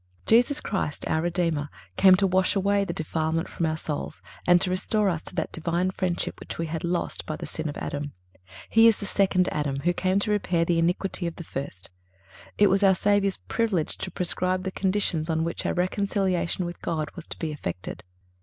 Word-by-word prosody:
(336) - - -10 0.2
Jesus 290 +1 -4
Christ, 170 -7 -2
our 160 - +1
Redeemer, 165 -4 0 0.3
came 190 -1 +7
to 195 +1 +2
wash 185 +1 +2
away 200 +1 +2
the 195 - -3
defilement 160 +1 -1
from 165 - -2
our 155 0 -1
souls 155 0 -4 0.3
and 175 0 +7
to 180 - 0
restore 205 +2 +1
us 170 -3 -1
to - - -7
that 165 - -1
Divine 170 +3 0
friendship 185 -2 -2
which - - -7
we 165 - -1
had 160 0 -4
lost 175 0 -2
by 155 - -2
the - - -6
sin 160 -1 -3
of 145 - -6
Adam. 145 0 -4 0.6
He 225 0 +6
is 225 - +5
the 200 - -6
second 185 -2 +2
Adam, 140 -2 -1
who 175 +3 +2
came 185 +2 +1
to 210 - -1
repair 175 -5 +1
the 170 0 +2
iniquity 175 +1 0
of 170 - -5
the 170 - -7
first. 135 - -6 0.7
It 205 - +6
was 195 0 +3
our 195 -2 +6
Savior's 200 0 +2
privilege 210 -9 -1
to - - -4
prescribe 185 +1 -1
the 190 - -2
conditions 185 -5 0
on 160 0 +1
which 170 - -2
our - - +1
reconciliation 185 -1 0
with 175 0 -7
God 155 -2 -2
was 175 -3 -9
to - - -7
be 160 -2 -3
effected. 90 -11 -5
175 Hz, 210 wpm, -26 LUFS, 160-190 Hz, 0.7 s, came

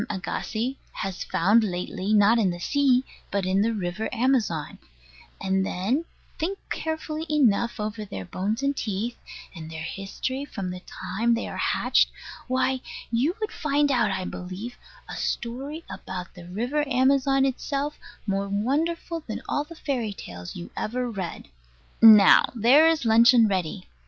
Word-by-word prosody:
Agassiz 225 +5 -3 0.2
has 195 -1 -4
found 205 +7 +3
lately, 185 +1 -3
not 215 +2 +5
in 200 -4 +3
the 175 - -3
sea, 265 +4 +2 0.2
but 200 -2 -1
in 190 +1 +2
the 225 +2 +2
river 205 0 -3
Amazon; 230 - 0 0.6
and 190 0 +1
then 215 - -1 0.3
think 375 +5 -1
carefully 315 -1 -3
enough 235 -6 +2
over 215 +1 -3
their 95 - -7
bones 210 - -2
and 280 0 +1
teeth, 220 +1 -3 0.4
and 160 -2 -8
their 160 -1 -6
history 195 - -4
from 195 -10 -5
the 180 - -6
time 205 +6 -1
they 230 - -3
are - - -6
hatched - - +3 0.4
why, 255 0 +1 0.3
you 265 +10 +1
would 430 -1 -2
find 290 -1 +1
out, 235 -5 +3
I 190 -1 -2
believe, 185 +8 -6 0.3
a - - -7
story 275 +7 -4
about 180 -2 -7
the 175 -1 -12
river 245 +11 -1
Amazon 270 +1 +3
itself, 280 +2 -2 0.3
more 195 -1 -1
wonderful 315 - -1
than 220 - -5
all 290 - -1
the 335 - -11
fairy 250 -9 -2
tales 90 - -9
you 175 - -8
ever 245 +2 -2
read. 190 -5 -5 0.5
Now 215 -3 +9
there 255 +8 +6
is 320 -5 +2
luncheon 230 +1 +6
ready. 180 - -2
230 Hz, 150 wpm, -25 LUFS, 195-270 Hz, 0.6 s, Now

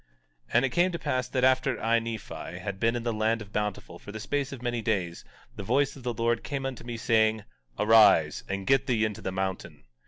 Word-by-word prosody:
17:7 - - -34
And 120 +2 +5
it - - 0
came 175 +8 +2
to - - -1
pass 130 -6 -1
that 125 0 -1
after 130 +1 +3
I, 115 +1 +2
Nephi, 110 -6 -6
had 95 +1 -5
been 115 +2 +2
in 120 - -3
the 115 -1 -1
land 110 +1 +1
of 105 -1 -11
Bountiful 105 -2 -3
for 105 - -10
the 110 - -7
space 140 +4 -2
of 135 - -7
many 120 -1 -2
days, 95 -7 -2 0.3
the - - -6
voice 135 +7 +1
of 135 - -11
the 120 0 -2
Lord 115 +1 0
came 140 -2 -4
unto 135 -3 -5
me, 120 -1 -5
saying: 110 -1 +2 0.3
Arise, 105 -8 +5
and 100 0 -3
get 135 +3 +3
thee 115 -4 +2
into 105 -2 -4
the 95 - -3
mountain. 95 0 -4
115 Hz, 230 wpm, -28 LUFS, 105-130 Hz, 0.3 s, And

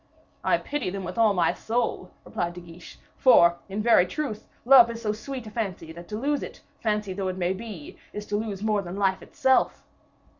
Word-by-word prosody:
"I - - +3
pity 285 -9 -3
them 195 +1 -5
with 180 +3 -5
all 215 -3 +4
my 170 -2 +2
soul," 230 -5 -2 0.2
replied 175 0 -3
De - - -7
Guiche; 170 0 -13 0.2
"for, 170 -9 +6
in 205 +2 -3
very 230 -6 +5
truth, 270 - -4 0.2
love 245 -2 +8
is 230 0 -5
so 215 -2 -1
sweet 245 +3 -6
a 215 - -9
fancy, 190 -8 -4
that 170 +1 -11
to 210 - -5
lose 285 +4 0
it, - - -8 0.2
fancy 210 -3 -1
though 190 0 -3
it 185 0 -3
may 180 0 0
be, 195 -6 -9
is 210 0 -6
to 205 - -3
lose 205 -2 -3
more 215 -2 +1
than 180 -1 -7
life 195 -2 +1
itself. 265 -1 +1
210 Hz, 210 wpm, -26 LUFS, 185-230 Hz, 0.2 s, love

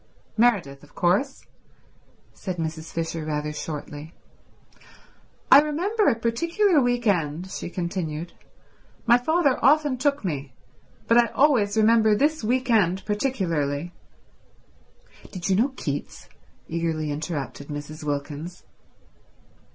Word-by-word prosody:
"Meredith 200 -13 +1
of 145 - -19
course," 195 +11 0 0.9
said 185 -3 -5
Mrs. 160 0 -4
Fisher 165 -1 -3
rather 150 0 -3
shortly. 150 +1 -7 1.4
"I 280 - +10
remember 370 +9 0
a 245 - +4
particular 335 - +2
week 245 -1 0
end"—she 175 -2 -1
continued. 170 -3 -4 0.7
"My 240 0 +5
father 305 0 +1
often 290 -2 +4
took 280 -4 0
me, 140 -6 -4 0.5
but 230 +1 +6
I 235 - +4
always 235 -9 +2
remember 220 -1 +5
this 300 +4 +1
week 250 +3 0
end 190 -4 +2
particularly—" 175 - -1 1.4
"Did 185 -1 -4
you - - +4
know 235 +8 +3
Keats?" 145 -1 -5 0.4
eagerly 160 -2 -2
interrupted 145 -2 -5
Mrs. 150 +1 -7
Wilkins. 150 +4 -5
185 Hz, 110 wpm, -24 LUFS, 155-245 Hz, 1.4 s, I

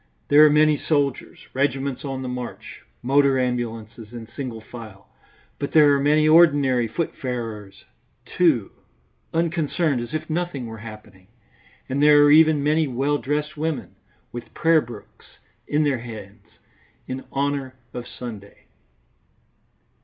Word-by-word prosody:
There 145 +1 +7
are 155 - +7
many 150 0 +4
soldiers, 145 -4 -2
regiments 135 -1 -1
on 135 -2 -4
the - - -4
march, 125 -1 -7 0.2
motor 135 +1 +3
ambulances 115 -3 -4
in 115 -2 -9
single 125 -5 -5
file, 110 -4 -12 0.5
but 140 - -4
there 150 -2 +6
are 140 - +2
many 150 +2 +3
ordinary 145 -7 +4
footfarers, 115 - -5 0.4
too, 150 - +1 0.6
unconcerned 165 -4 0
as 120 +5 -6
if 155 - -4
nothing 165 -5 -3
were 110 -1 -8
happening, 105 -4 -12 0.6
and 135 +2 -2
there 150 0 +7
are 145 - +5
even 155 -1 +5
many 155 +1 +2
well 140 +3 0
dressed 150 +2 -2
women, 155 -1 -4 0.4
with 120 0 -9
prayer 165 -1 +4
books 115 -5 -13 0.3
in 150 +1 +1
their 140 -4 0
hands, 110 -4 -10 0.6
in 130 +1 -5
honour 140 -1 -2 0.2
of 120 -1 -6
Sunday. 105 -5 -10
135 Hz, 130 wpm, -23 LUFS, 120-150 Hz, 0.6 s, There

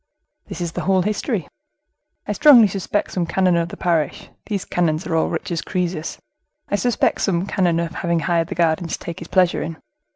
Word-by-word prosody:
"This - - -7
is 170 -1 -2
the - - -4
whole 190 -1 +3
history. 210 - -2 0.8
I - - -1
strongly 240 -1 +7
suspect 195 +1 -2
some 175 -2 -1
canon 185 0 +2
of 170 0 0
the - - -9
parish 165 -5 -1 0.2
(these 200 -4 -2
canons 165 -1 0
are 165 - -1
all 160 - +2
rich - - -4
as 165 -2 -1
Croesus)—I 185 - -5
suspect 240 +2 +1
some 180 -2 +1
canon 175 -4 +1
of 170 -1 -3
having 170 -2 -1
hired 170 -2 +1
the 190 - -5
garden 165 +1 +1
to - - -3
take 170 - -7
his 170 - -8
pleasure 185 -2 +2
in. 165 -1 -5
175 Hz, 195 wpm, -21 LUFS, 170-195 Hz, 0.8 s, strongly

